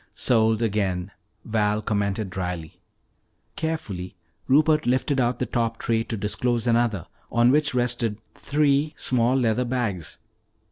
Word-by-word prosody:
"Sold 110 -1 +2
again," 100 -4 -1 0.3
Val 105 -1 +1
commented 100 -2 -1
dryly. 90 -4 -5 0.7
Carefully 100 - -4 0.3
Rupert 150 +1 +3
lifted 130 +2 +1
out 120 0 +1
the - - -1
top 115 -1 -1
tray 115 -1 0
to 115 - -4
disclose 115 +4 0
another 115 -6 +1 0.3
on 120 +1 +4
which 145 -1 +2
rested 120 -3 0 0.2
three 145 +1 +1
small 125 0 +1
leather 125 -1 +2
bags. 115 -9 -3
115 Hz, 125 wpm, -24 LUFS, 105-125 Hz, 0.7 s, on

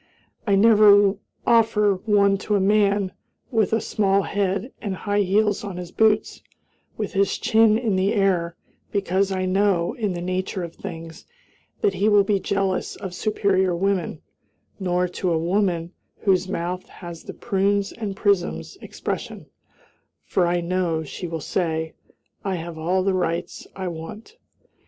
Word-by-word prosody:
I 200 - +4
never 205 -1 +6 0.3
offer 215 -4 +3
one 200 -2 +4
to 210 - -1
a - - +3
man 200 -1 +2 0.4
with 220 -5 +2
a 225 - +2
small 200 -2 +1
head 200 +5 -1
and 200 -3 -3
high 205 +3 0
heels 205 +2 +1
on 195 -3 -6
his 180 -1 -7
boots, 220 -1 +2 0.6
with 210 - -3
his 195 0 +1
chin 220 -1 +4
in 225 -4 0
the 190 +2 +2
air, 180 -4 +1 0.4
because 195 -1 0
I 185 -1 -1
know, 190 -1 +1
in 215 -7 -2
the 175 - -4
nature 185 +1 -2
of 170 -1 -7
things, 165 0 -9 0.5
that 415 -2 +2
he 210 - +2
will 205 -1 +5
be 200 0 +1
jealous 195 -1 -1
of 190 -2 -7
superior 190 -2 +1
women; 185 -3 -1 0.6
nor 180 -1 0
to 180 0 -2
a 165 - +2
woman 175 0 0 0.3
whose 190 -2 +2
mouth 180 0 -3
has 170 -2 -10
the - - -7
"prunes 200 -1 0
and 210 -4 -5
prisms" 180 - 0
expression, - - -6 0.7
for 180 -2 +1
I 175 0 +1
know 170 -2 -1
she 175 +4 -6
will 165 -1 -4
say, 160 -1 -2 0.5
"I 195 -2 -1
have 170 -1 -6
all 175 +4 0
the 195 0 +1
rights 175 -1 -2
I 190 -1 -4
want." 175 - -8
195 Hz, 155 wpm, -23 LUFS, 175-205 Hz, 0.7 s, never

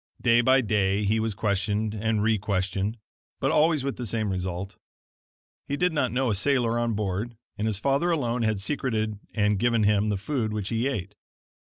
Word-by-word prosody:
Day 120 0 +4
by 130 +2 +4
day 105 -3 +1
he 105 +2 +2
was 110 -2 -1
questioned 105 +1 0
and 110 0 0
requestioned, 100 -1 0 0.4
but - - +1
always 155 -2 +3
with 140 -1 -3
the 120 - -4
same 110 -1 -1
result. 95 +1 -4 0.9
He 140 - -2
did 180 +1 +2
not 135 -5 +1
know 125 -1 +1
a - - +2
sailor 120 +1 +1
on 120 -2 0
board, 105 +3 -3 0.2
and 105 - -2
his 105 -3 -1
father 140 +8 +1
alone 125 -8 0
had 110 -3 +1
secreted 110 -3 -1 0.2
and 105 -2 +2
given 115 -1 +2
him 105 0 +3
the 105 - 0
food 110 +1 -2
which 105 -2 -3
he 115 +2 0
ate. 105 -7 -3
110 Hz, 185 wpm, -26 LUFS, 100-120 Hz, 0.9 s, Day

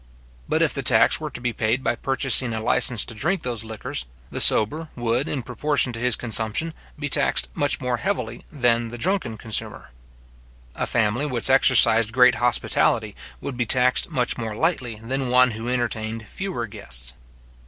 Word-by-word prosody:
But - - +2
if - - +1
the - - -2
tax - - +5
were - - -5
to - - -9
be 120 -1 -2
paid 110 +4 -1
by - - +1
purchasing 130 -1 0
a - - -3
licence 110 +1 +2
to - - -8
drink 160 - -1
those 120 -3 -3
liquors, 110 - -5 0.3
the - - -1
sober 155 +9 +4
would, 120 +2 -1
in 135 -4 -3
proportion 130 +1 0
to 115 - -6
his 125 -1 0
consumption, 115 +7 -2 0.2
be 145 0 -3
taxed - - +1
much 145 -1 -1
more 125 -2 -2
heavily 120 0 -3
than 120 -5 +1
the 120 +1 -8
drunken 175 - -2
consumer. 110 - -4 0.8
A - - -3
family 115 +6 0
which 125 -2 +1
exercised 115 -4 +4
great 125 0 +6
hospitality, 110 -3 +1 0.3
would 140 - -5
be 120 -1 -2
taxed 125 +2 +3
much 125 -2 -1
more 110 -2 -4
lightly 130 -5 -1
than 130 +4 -4
one 125 0 +4
who 115 +2 -5
entertained 115 -2 -3
fewer 185 - -4
guests. 65 - -7
120 Hz, 175 wpm, -23 LUFS, 110-130 Hz, 0.8 s, great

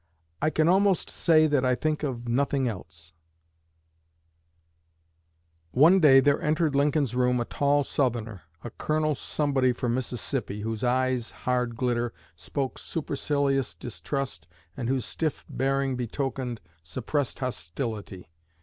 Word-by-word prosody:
"I 155 - +3
can 155 0 +2
almost 195 +1 +3
say 155 -2 +4
that 145 -4 +2
I 125 -1 +3
think 155 +2 -1
of 125 -5 -3
nothing 135 +2 +1
else." 85 -6 -7 2.6
One 165 +9 +6
day 140 -5 +7
there 140 +1 +3
entered 155 0 +1
Lincoln's 140 -2 +2
room 125 0 +2
a 120 - -1
tall 145 +2 +2
Southerner, 115 - -1 0.2
a 120 - -6
Colonel 155 +3 0
Somebody 135 -2 +1
from 120 -1 -1
Mississippi, 120 -3 -3
whose 110 +1 -3
eye's 125 -1 +1
hard 125 -2 -1
glitter 120 -1 0 0.2
spoke 135 -2 -4
supercilious 140 -3 -1
distrust 125 - -5 0.3
and 120 -2 -3
whose 130 -4 0
stiff 155 +6 -3
bearing 135 0 0
betokened 125 0 -3 0.2
suppressed 130 - -2
hostility. 100 - -5
130 Hz, 120 wpm, -27 LUFS, 120-145 Hz, 2.6 s, day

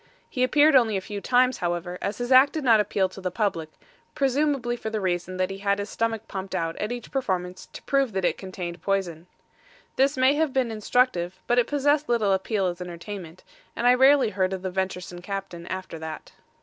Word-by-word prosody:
He 255 - -1
appeared 290 +3 +5
only 225 -5 +4
a - - 0
few 205 +1 -7
times, 255 +2 +2
however, 175 +1 -3
as 200 - -3
his 245 +1 -4
act 260 +2 +7
did 315 - -3
not 230 -4 +5
appeal 200 -2 +1
to 195 - -11
the 185 - -1
public, 180 -5 -2 0.5
presumably 275 -3 +1
for 225 -2 -5
the 220 0 -2
reason 185 -1 -2
that 185 +1 0
he 195 - -7
had 200 0 +1
his 205 +1 -5
stomach 225 -1 -2
pumped 190 -1 -5
out 165 0 -2
at 210 - -3
each 245 -2 -6
performance, 185 -8 -3
to - - -10
prove 275 -5 +1
that 190 -1 -1
it - - +2
contained 180 -2 -6
the - - -26
poison. 180 -3 -2 0.7
This 270 +1 +3
may 260 +2 +5
have 300 -2 0
been 255 -3 +1
instructive, 215 -5 0
but 240 +1 +3
it 240 - +2
possessed 290 0 +1
little 220 -5 +2
appeal 195 +1 0
as 180 0 -3
entertainment, 180 0 -8 0.3
and 235 - -2
I 245 - +7
rarely 265 -2 +5
heard 185 0 0
of 190 -1 -5
the 185 - -3
venturesome 180 -1 -4
captain 190 -3 -6
after 185 -3 -6
that. 160 -1 -7
200 Hz, 215 wpm, -25 LUFS, 185-250 Hz, 0.7 s, act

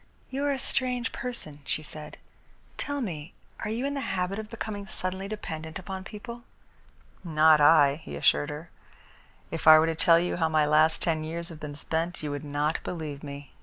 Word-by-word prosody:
"You 270 +2 -2
are 285 - +2
a 275 - 0
strange 250 -2 -1
person," 235 -12 -3
she 155 - -2
said. 155 0 -9 0.6
"Tell 285 -1 -3
me, 165 - -5 0.2
are - - -3
you 235 +5 -1
in 280 - -1
the 280 - -2
habit 190 -2 -1
of 215 -1 -6
becoming 210 -3 -5
suddenly 190 -1 -3
dependent 160 -7 -5
upon 190 0 -6
people?" 235 +3 -8 0.8
"Not 155 -2 +5
I," 145 -2 +6
he - - -7
assured 145 - +3
her. 150 +3 -7 0.8
"If 165 -1 -4
I 155 0 +11
were 155 - +5
to 165 - 0
tell 165 +1 +5
you 175 +1 0
how 160 -2 +2
my 155 -1 +3
last 155 +2 +4
ten 160 -2 0
years 170 +2 -5
have 160 -3 -10
been 145 -2 -6
spent, 165 +3 -2
you 150 - -2
would 145 +1 -4
not 150 +2 0
believe 155 -5 -5
me. 140 -1 -8
165 Hz, 195 wpm, -28 LUFS, 155-205 Hz, 0.8 s, I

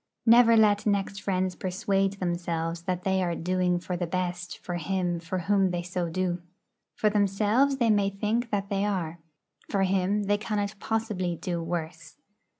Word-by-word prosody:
Never 230 0 +7
let 210 -1 +4
next 200 -1 0
friends 185 -1 0
persuade 195 +1 0
themselves 170 -3 -2
that 180 -1 -2
they 190 -1 +1
are 175 -2 0
'doing 180 +1 +1
for 175 +1 -4
the 175 0 -2
best' 175 0 -3
for 175 -1 -5
him 175 0 -1
for 170 +2 -4
whom 195 +1 +2
they 175 -1 -2
so 180 -1 -3
do. 180 0 -1 0.5
For 215 - +1
themselves 210 +7 +2
they 235 -4 +3
may 200 -1 +3
think 215 +4 -1
that 200 -2 -2
they 200 -1 0
are. 175 -5 -2 0.5
For 195 -2 +1
him 195 +2 +1
they 205 +1 +1
cannot 205 -1 -2
possibly 210 -6 -1
do 170 0 -3
worse. 165 -1 -5
190 Hz, 165 wpm, -27 LUFS, 175-205 Hz, 0.5 s, Never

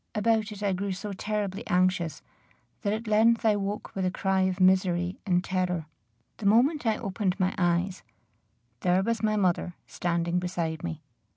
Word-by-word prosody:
About 220 0 +1
it 210 0 -7
I 200 -2 +1
grew 195 +1 -2
so 200 +2 -5
terribly 205 +1 -3
anxious, 185 -3 +1 0.6
that 200 - 0
at 220 +2 -3
length 225 +2 +3
I 215 -1 +5
woke 205 +1 -4
with 190 - -2
a 185 - +2
cry 190 +1 0
of 185 - -4
misery 185 -1 +2
and 180 -1 +2
terror. 180 -4 -1 0.5
The 200 - -1
moment 250 +6 +3
I 220 - +2
opened 195 -2 -2
my 185 0 +1
eyes, 175 +1 +1 0.8
there 180 +1 +2
was 230 +1 -1
my 215 -1 +1
mother 180 -3 0
standing 170 0 -1
beside 170 -3 -3
me. 165 -3 -5
190 Hz, 170 wpm, -27 LUFS, 180-210 Hz, 0.8 s, I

